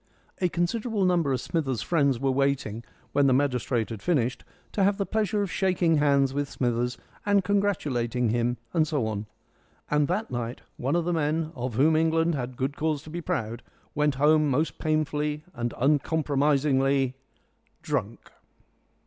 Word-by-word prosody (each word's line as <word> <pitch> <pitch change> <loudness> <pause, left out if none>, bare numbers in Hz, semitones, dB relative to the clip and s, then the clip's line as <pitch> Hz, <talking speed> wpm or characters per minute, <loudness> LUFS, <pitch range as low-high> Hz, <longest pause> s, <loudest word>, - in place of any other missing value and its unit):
A 180 - +2
considerable 205 +4 0
number 170 -6 +2
of 130 - 0
Smithers' 135 -8 -2
friends 140 -7 +2
were 135 0 +1
waiting, 130 -5 0 0.3
when 145 -1 +3
the 130 - +4
magistrate 125 -4 0
had 110 - -6
finished, 130 -8 0 0.3
to 200 - +1
have 200 +1 +3
the 200 - -1
pleasure 210 -1 0
of 195 - -4
shaking 180 -4 +2
hands 140 -2 +3
with 145 0 -2
Smithers, 120 -1 -1 0.3
and 200 -1 +3
congratulating 140 - 0
him, 120 +2 0 0.2
and 160 -2 +2
so 145 -7 0
on. 105 -1 -3 0.6
And 150 -1 +3
that 205 +6 -2
night 120 0 -4 0.2
one 135 +6 -1
of 170 -1 +1
the 175 - 0
men 155 0 0
of 125 -2 -4
whom 155 +6 +4
England 165 +1 +2
had 125 -3 -4
good 135 +2 -2
cause 155 -2 -1
to 155 - -11
be 175 +1 -4
proud 115 -6 -3 0.3
went 150 -1 +1
home 150 +2 +4
most 140 +1 0
painfully 150 -1 -1
and 120 0 -2
uncompromisingly 140 -2 +2 0.7
drunk. - - -3
145 Hz, 160 wpm, -26 LUFS, 130-165 Hz, 0.7 s, the